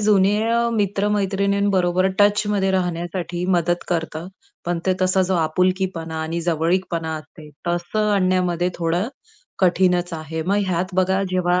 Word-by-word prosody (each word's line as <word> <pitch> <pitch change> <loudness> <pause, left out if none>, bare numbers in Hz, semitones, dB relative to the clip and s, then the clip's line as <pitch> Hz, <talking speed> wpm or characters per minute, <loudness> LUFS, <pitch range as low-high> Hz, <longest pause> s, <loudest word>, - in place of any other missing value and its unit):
जुने 205 -1 +3 0.3
मित्र-मैत्रिणींबरोबर 200 -2 +1
टचमध्ये 205 -1 +3
राहण्यासाठी 175 -1 -2
मदत 175 +1 0
करतं. 165 -1 -2 0.4
पण 175 0 -1
ते 190 - +4
तसा 185 +1 +3
जो 185 0 0
आपुलकीपणा 170 0 0
आणि 165 +2 -3
जवळीकपणा 165 0 0
असते, 155 0 -12 0.2
तसं 175 +5 0
आणण्यामध्ये 180 -2 +1
थोडं 175 +5 -1 0.5
कठीणच 180 -1 +2
आहे. 160 0 -4
मग 195 +5 0
ह्यात 180 -1 0
बघा 190 +1 +2
जेव्हा 180 -1 +1
180 Hz, 120 wpm, -21 LUFS, 170-190 Hz, 0.5 s, ते